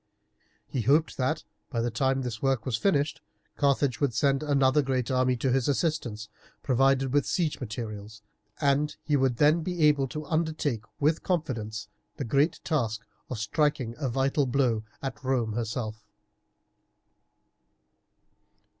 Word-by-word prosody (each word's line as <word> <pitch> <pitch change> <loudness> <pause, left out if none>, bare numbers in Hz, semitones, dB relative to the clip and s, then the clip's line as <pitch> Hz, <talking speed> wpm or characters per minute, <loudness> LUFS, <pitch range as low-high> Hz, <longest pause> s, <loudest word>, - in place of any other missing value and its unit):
He 130 - -2
hoped 150 +7 +3
that, 130 +4 0 0.3
by 120 - -2
the 120 +1 0
time 135 +3 +1
this 115 -3 -5
work 135 -4 +1
was 130 - 0
finished, 150 - +1 0.3
Carthage 140 -3 +1
would 135 -6 +1
send 135 +3 +2
another 140 -1 +3
great 130 -2 -1
army 130 -1 +2
to 130 +2 0
his 130 -1 +1
assistance 130 -8 -1 0.4
provided 135 0 +2
with 145 -1 +4
siege 165 -4 0
materials, 110 -3 -6 0.4
and 145 +1 +1
he 150 - +1
would 130 -3 +2
then 150 +5 +4
be 175 0 -2
able 145 -3 +4
to 150 +3 -6
undertake 155 -8 -1
with 150 +2 +2
confidence 115 - -2 0.3
the 140 - -3
great 140 +7 +2
task 115 -9 -1 0.3
of 125 - -4
striking 120 +2 0
a 135 -4 -1
vital 135 +3 +1
blow 120 -4 +1 0.2
at 135 0 -5
Rome 125 -4 0
herself. 110 -1 -3
135 Hz, 140 wpm, -28 LUFS, 115-145 Hz, 0.4 s, with